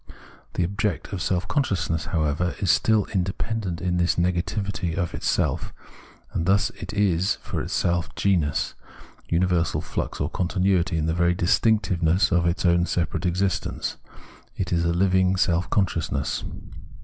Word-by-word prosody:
The - - +1
object 100 +2 -2
of 95 - -3
self 90 0 0
consciousness, 90 - 0
however, 80 +1 0
is 95 -5 +2
still 110 +2 +3
independent 95 0 -2
in 90 -1 0
this 85 0 +2
negativity 90 +1 -1
of 90 -3 -2
itself; - - -1 0.6
and 85 - -1
thus 100 +1 +3
it - - -8
is 95 -3 +2
for - - -3
itself 85 -1 0
genus, 85 -8 +1 0.6
universal 85 -1 +1
flux - - -4
or - - 0
continuity 90 -1 +1
in 80 - 0
the 80 - +1
very 85 +1 +2
distinctiveness 90 -2 +2
of 85 0 +3
its 85 +2 0
own 85 0 +3
separate 90 +2 -1
existence; 95 +1 -1 0.6
it 90 -2 -2
is 85 -1 +1
a 85 - +2
living 95 +1 +3
self 90 -1 +1
consciousness. 90 -6 0
90 Hz, 140 wpm, -24 LUFS, 85-95 Hz, 0.6 s, still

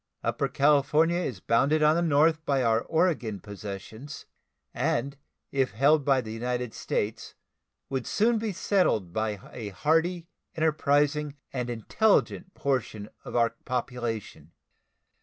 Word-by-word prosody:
Upper 140 - 0
California 150 +4 +3
is 125 - -4
bounded 140 +7 +2
on 155 +1 +5
the 170 - +1
north 160 0 +3
by 140 -4 +1
our 115 -1 +3
Oregon 160 - 0
possessions, 105 +7 -8 0.5
and 140 +4 -1 0.4
if 135 -4 0
held 140 +6 +4
by 135 -1 +3
the 110 -2 -8
United 125 0 -3
States 110 +2 -3 0.5
would 130 -2 -3
soon 225 +2 +2
be 220 -1 -2
settled 180 - +1
by 110 -2 -1
a 110 -4 -5
hardy, 165 - 0 0.3
enterprising, 150 -2 +1 0.2
and 125 -2 -2
intelligent 185 - +1
portion 120 -6 -2
of - - -8
our 115 -1 +3
population. 115 - -4
135 Hz, 125 wpm, -27 LUFS, 115-155 Hz, 0.5 s, on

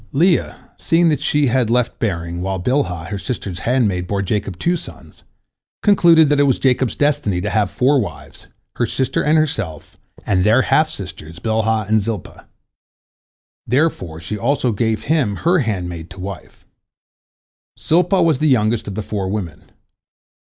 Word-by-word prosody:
" - - -32
Leah, 170 +4 0
seeing 165 0 +3
that 150 -4 0
she 150 -1 +1
had 125 -2 +1
left 125 0 0
bearing, 85 -5 -3
while 95 +1 -2
Bilhah, 90 - -1
her 100 -1 -4
sister's 95 -6 -5
handmaid, 105 -9 +1
bore 100 0 -1
Jacob 100 -2 -2
two 175 - 0
sons, - - -11 0.6
concluded 170 -6 +5
that 145 -1 +2
it 145 -1 +4
was 130 - +2
Jacob's 130 -2 +1
destiny 135 -11 0
to 105 +3 -3
have 105 0 +1
four 135 +3 +2
wives, 105 - -9 0.3
her - - +1
sister 130 - -1
and 155 +2 +3
herself, 110 - -3 0.3
and 90 -2 +1
their 115 +6 +4
half - - +2
sisters 80 +2 -8
Bilhah 110 +1 0
and 110 0 +2
Zilpah. 105 -3 -6 1.2
Therefore 120 - 0
she 100 +5 -5
also 130 +1 +1
gave 110 +1 -1
him 140 -10 +1
her 175 - +2
handmaid 90 - -3
to 90 - -12
wife. 95 0 -9 1.1
Zilpah 180 +3 +2
was 160 -5 +2
the 155 - +2
youngest 110 -3 +1
of 100 - -5
the 110 - -3
four 100 -2 -3
women. 95 -6 -5
110 Hz, 160 wpm, -19 LUFS, 95-145 Hz, 1.2 s, concluded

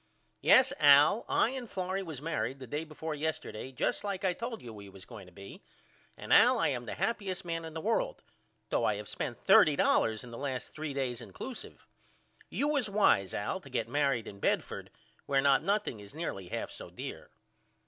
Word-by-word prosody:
Yes 260 0 +6
Al 145 +8 +6
I 230 - +3
and 255 -4 -6
Florrie 185 0 -2
was 160 -7 -7
married 130 -5 -2
the 135 - -9
day 145 +6 -3
before 160 0 -6
yesterday 150 -5 -4
just 130 - -1
like 200 -2 -3
I 185 - +2
told 230 +4 -6
you 115 -2 -8
we 100 -2 -10
was 95 -1 -12
going 100 -4 -11
to - - -15
be 100 +2 -11 0.6
and - - -1
Al - - +7
I - - +2
am 120 -1 -3
the - - -4
happyest 195 -2 -2
man 165 -1 -3
in 160 0 -9
the 160 - -3
world - - -1 0.5
though - - +1
I - - +2
have - - -7
spent - - -5
$30 145 - +4
in 120 - -10
the 115 - -7
last 135 -3 -4
3 150 -2 -5
days 130 -3 -2
incluseive. 260 -2 -8 0.6
You 285 - 0
was 285 -7 +1
wise 150 - +3
Al 105 - -2
to 140 - -13
get 115 -3 -1
married 135 -3 +1
in 100 - -9
Bedford - - -1 0.4
where 135 -1 +3
not 140 0 +4
nothing 200 - -1
is 100 +5 -12
nearly 100 - -4
half - - -4
so - - -9
dear. - - -8
150 Hz, 200 wpm, -31 LUFS, 120-195 Hz, 0.6 s, Al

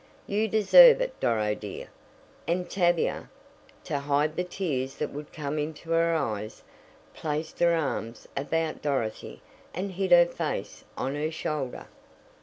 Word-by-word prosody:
"You 210 +2 0
deserve 470 - +8
it, - - -3
Doro, 105 -2 +1
dear," 105 -2 -8 0.6
and 175 +1 0
Tavia, 175 -3 0 0.5
to 145 - -2
hide 145 +2 0
the 180 - 0
tears 145 -8 -3
that 150 - -3
would 145 +1 -8
come 150 0 -3
into 155 +2 -5
her 165 0 +3
eyes, 110 -8 -3 0.5
placed 155 0 -4
her 170 -1 +4
arms 130 -7 -3
about 155 +3 -2
Dorothy 130 -7 -3 0.3
and 190 +3 -3
hid 190 +1 -2
her 175 0 +8
face 170 - -4
on 135 - -2
her 150 +2 -1
shoulder. 150 -4 -4
155 Hz, 140 wpm, -27 LUFS, 140-175 Hz, 0.6 s, deserve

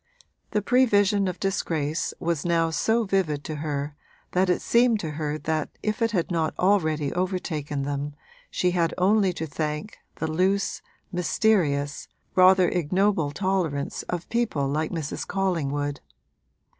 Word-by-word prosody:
The 210 - 0
prevision 205 -5 +3
of 185 - -4
disgrace 160 -6 -1
was 165 -3 -1
now 165 -1 +2
so 225 +8 +2
vivid 185 -8 0
to 155 -2 -5
her 145 -1 -3 0.4
that 185 +1 +2
it 180 - +1
seemed 235 -2 +4
to 160 - -4
her 150 0 -2
that 155 0 -2
if 215 +2 -1
it 230 - +3
had 185 -5 -1
not 165 -2 0
already 155 -7 +2
overtaken 160 -6 -2
them 145 +1 -3 0.3
she 180 - +1
had 170 -2 +1
only 195 +1 +3
to 160 - -4
thank 150 +5 -4 0.2
the - - -3
loose, 185 +5 0 0.3
mysterious, 170 -6 +1 0.3
rather 185 -1 +6
ignoble 180 -1 +1
tolerance 165 -4 -1
of 175 -1 -3
people 225 -13 0
like 155 +3 -1
Mrs. 160 -4 -4
Collingwood. 145 -7 -1
170 Hz, 140 wpm, -25 LUFS, 150-195 Hz, 0.4 s, rather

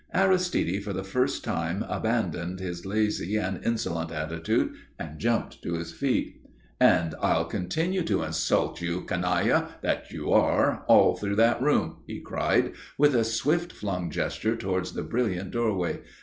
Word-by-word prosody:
Aristide 180 - +2
for 100 - -4
the 95 - -3
first 125 +7 0
time - - -2
abandoned 90 +2 -1
his 90 -1 -5
lazy 105 -1 0
and 95 -3 -3
insolent 85 -8 -1
attitude 80 +1 -1 0.2
and 80 -1 -7
jumped 115 0 -1
to 85 - -4
his 85 0 -5
feet. 135 +8 -1 0.4
"And 80 -1 +4
I'll - - +2
continue 165 - -1
to 125 - +1
insult 80 +2 0
you, 85 +1 -2
canaille 90 0 +1 0.2
that - - -1
you - - -2
are, - - +3
all - - +6
through 100 -1 -2
that 115 +2 +4
room," 130 - +1
he - - -6
cried, - - +1 0.3
with 145 0 +5
a 120 -2 +3
swift 150 +11 0
flung 90 -4 -3
gesture 110 +8 -1
towards 95 -4 -2
the - - -3
brilliant 100 -6 -1
doorway. 105 -7 0
95 Hz, 150 wpm, -27 LUFS, 85-120 Hz, 0.4 s, all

